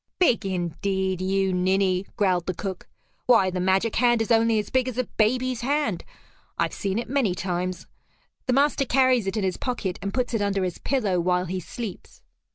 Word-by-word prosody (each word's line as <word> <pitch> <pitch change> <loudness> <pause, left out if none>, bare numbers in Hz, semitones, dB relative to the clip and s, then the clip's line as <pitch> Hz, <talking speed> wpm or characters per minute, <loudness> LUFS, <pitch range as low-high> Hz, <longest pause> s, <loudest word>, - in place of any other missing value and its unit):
"Big 240 - +2
indeed, 190 +1 -2
you 190 0 +1
ninny!" 185 +1 +1
growled 185 -4 +1
the 185 - -2
cook. 190 0 -5 0.4
"Why, 225 -7 +5
the 180 - -3
magic 190 +4 +1
hand 240 -1 +4
is 225 +1 -1
only 225 0 +4
as 210 - -2
big 260 -1 +2
as 250 -2 -4
a 255 - +2
baby's 250 +2 0
hand. 275 - 0 0.5
I've - - 0
seen 195 0 -2
it 235 - -2
many 245 -8 +1
times. 180 -1 -3 0.6
The 255 - +2
master 280 +1 +3
carries 255 -5 +3
it 195 - -2
in 210 - 0
his 185 -1 -1
pocket, 225 -8 -3
and 200 - -3
puts 250 0 -1
it 225 - 0
under 200 -1 0
his 180 -2 -3
pillow 210 -10 0
while 180 +1 +1
he 185 +1 -3
sleeps." 205 +3 -8
200 Hz, 190 wpm, -25 LUFS, 185-240 Hz, 0.6 s, Why